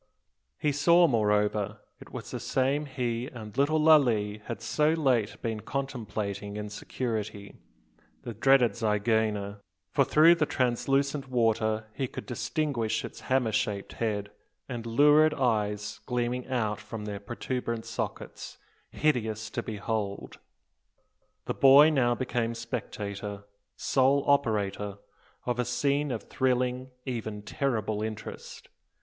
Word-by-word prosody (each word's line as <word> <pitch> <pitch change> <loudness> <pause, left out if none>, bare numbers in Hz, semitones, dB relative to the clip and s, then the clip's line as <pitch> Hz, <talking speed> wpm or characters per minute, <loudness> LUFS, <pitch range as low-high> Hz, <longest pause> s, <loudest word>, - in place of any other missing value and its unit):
He 150 - +1
saw, 170 +5 +5
moreover, 105 -4 +1 0.2
it - - -14
was - - -7
the - - -4
same 140 +3 0
he 125 -2 -2
and 115 -7 -9
little 145 +4 +2
Lalee 120 -10 +4
had 115 -3 -5
so 150 +7 +2
late 130 -9 +1
been 110 -2 -2
contemplating 105 -6 -4
in 105 0 -5
security, 105 -3 -4 0.6
the 120 - -5
dreaded 125 +2 +4
zygaena: 105 -1 0 0.3
for - - +4
through 160 +3 +6
the 160 -3 +1
translucent 135 +2 0
water 110 -3 +1
he 135 +1 -2
could - - -8
distinguish 120 -2 -1
its - - -9
hammer 130 -3 +1
shaped 100 -2 -2
head, 105 -3 -2 0.4
and 120 -3 -5
lurid 150 +6 +5
eyes 105 -4 0
gleaming 125 0 -1
out 110 -5 -1
from 110 -2 -7
their 100 -1 -4
protuberant 115 +2 -4
sockets, - - -5 0.3
hideous 110 -7 -1
to - - -2
behold! 105 -1 -4 1.1
The - - -1
boy 140 +3 +7
now 120 -5 +2
became 120 -2 -1
spectator, 105 -3 -5 0.3
sole 135 +1 +2
spectator, 105 -7 +1 0.5
of 125 0 -1
a - - +3
scene 140 +4 0
of 120 -4 -3
thrilling, 125 0 0 0.2
even 110 -5 -4
terrible 110 -4 -1
interest. 110 -1 -7
115 Hz, 125 wpm, -28 LUFS, 105-135 Hz, 1.1 s, boy